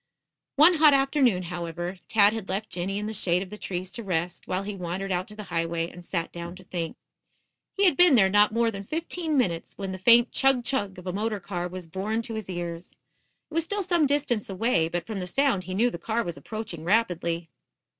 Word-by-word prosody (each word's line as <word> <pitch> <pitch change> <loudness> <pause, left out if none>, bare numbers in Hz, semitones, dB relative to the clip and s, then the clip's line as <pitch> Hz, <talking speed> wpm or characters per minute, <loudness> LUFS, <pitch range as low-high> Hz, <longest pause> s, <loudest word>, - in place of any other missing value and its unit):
One 310 +6 +7
hot 305 -3 +6
afternoon, 270 -8 +2
however, 175 +1 -5
Tad 210 -1 +5
had 220 -4 -5
left 200 +3 -2
Jinny 185 +2 -2
in 210 - -3
the 220 - -4
shade 180 -2 +1
of 185 - -12
the 210 - -7
trees 185 0 -4
to 235 - -5
rest, 175 -2 -2
while 185 +1 -1
he 205 0 -5
wandered 185 +2 -4
out 180 +1 -1
to 210 - -11
the 210 - -7
highway 165 0 -1
and 175 - -12
sat 170 -1 -3
down 170 +1 -7
to 185 - -13
think. 170 -3 -4 0.8
He 400 - +3
had 360 - +5
been 355 -5 +6
there 205 -5 +6
not 205 +2 +4
more 230 +1 +2
than 200 -2 -6
fifteen 320 - -2
minutes 170 -10 -1
when 195 -1 -4
the 190 - -6
faint 235 +5 +6
chug, 270 -2 +3
chug 220 -7 0
of 180 - -11
a 180 - -3
motor 210 +1 -1
car 175 -2 -4
was 180 0 -7
borne 200 +7 -2
to 230 - -5
his 220 -4 -5
ears. 175 -1 -5 0.6
It - - -11
was 330 +1 +1
still 405 +4 -2
some 345 -5 +2
distance 270 -7 0
away, 190 -4 +1
but 170 -1 -3
from 215 -3 -4
the 180 - -4
sound 245 -4 +1
he 185 +1 -4
knew 240 +5 +3
the 170 - -6
car 230 +6 -1
was 170 -1 -5
approaching 215 -7 -6
rapidly. 170 -4 0
195 Hz, 225 wpm, -26 LUFS, 175-235 Hz, 0.8 s, One